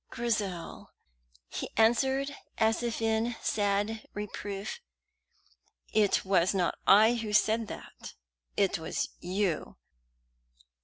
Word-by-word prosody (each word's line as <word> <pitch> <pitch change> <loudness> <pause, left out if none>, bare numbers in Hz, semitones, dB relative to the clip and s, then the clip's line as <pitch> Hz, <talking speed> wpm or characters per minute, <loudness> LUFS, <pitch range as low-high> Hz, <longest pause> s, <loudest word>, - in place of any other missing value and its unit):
"Grizel!" 205 -8 -3 0.5
he - - -5
answered, 265 +5 +3 0.2
as 220 +1 +2
if 235 -1 -2
in 225 +1 +1
sad 205 +1 0
reproof; 205 - -5 1.1
"it 210 -3 +3
was 190 0 +3
not 180 -2 +1
I 215 +4 +7
who 225 -3 -3
said 220 +1 +3
that - - -9 0.4
it - - +2
was - - -2
you. 180 -2 -2
215 Hz, 100 wpm, -30 LUFS, 200-230 Hz, 1.1 s, I